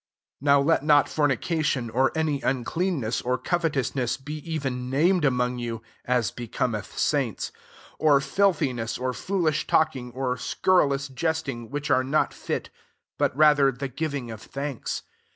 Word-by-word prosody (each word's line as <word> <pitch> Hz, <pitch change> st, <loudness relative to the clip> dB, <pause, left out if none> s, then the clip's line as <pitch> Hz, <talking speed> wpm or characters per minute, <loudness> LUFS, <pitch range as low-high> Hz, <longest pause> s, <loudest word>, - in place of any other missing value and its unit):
3 140 Hz, -, -12 dB
NOW 140 Hz, 0 st, +6 dB
let 150 Hz, 0 st, +2 dB
not 145 Hz, -2 st, +5 dB
fornication, 145 Hz, -4 st, 0 dB
or 130 Hz, +3 st, +2 dB
any 155 Hz, -3 st, 0 dB
uncleanness, 135 Hz, -1 st, -1 dB
or 125 Hz, +1 st, 0 dB
covetous 150 Hz, -2 st, 0 dB
ness, 125 Hz, -3 st, -1 dB
be 150 Hz, +3 st, -6 dB
even 135 Hz, -6 st, -3 dB
named 170 Hz, +6 st, +3 dB
among 125 Hz, -2 st, +1 dB
you, 115 Hz, -2 st, -4 dB, 0.2 s
(as 120 Hz, -2 st, +1 dB
becometh 120 Hz, -2 st, -3 dB
saints;) -, -, 0 dB, 0.5 s
4 150 Hz, -2 st, +5 dB
of 140 Hz, -, -1 dB
filtki 170 Hz, -9 st, +2 dB
ness, 115 Hz, -1 st, -3 dB
or 130 Hz, 0 st, -2 dB
foolish 155 Hz, -, -1 dB
talking, 135 Hz, -6 st, +1 dB
or 130 Hz, -1 st, -1 dB
scur 185 Hz, +7 st, +2 dB
rilous 140 Hz, 0 st, -2 dB
jesting, 140 Hz, -7 st, -2 dB
which 145 Hz, +1 st, -3 dB
are 130 Hz, -, +4 dB
not 140 Hz, +4 st, +1 dB
fit: -, -, -4 dB, 0.5 s
but -, -, +1 dB
rather 150 Hz, -3 st, +6 dB
the 135 Hz, +2 st, -4 dB
giving 140 Hz, -3 st, -3 dB
of 110 Hz, -1 st, -8 dB
thanks. 140 Hz, -2 st, -4 dB
140 Hz, 155 wpm, -26 LUFS, 125-155 Hz, 0.5 s, NOW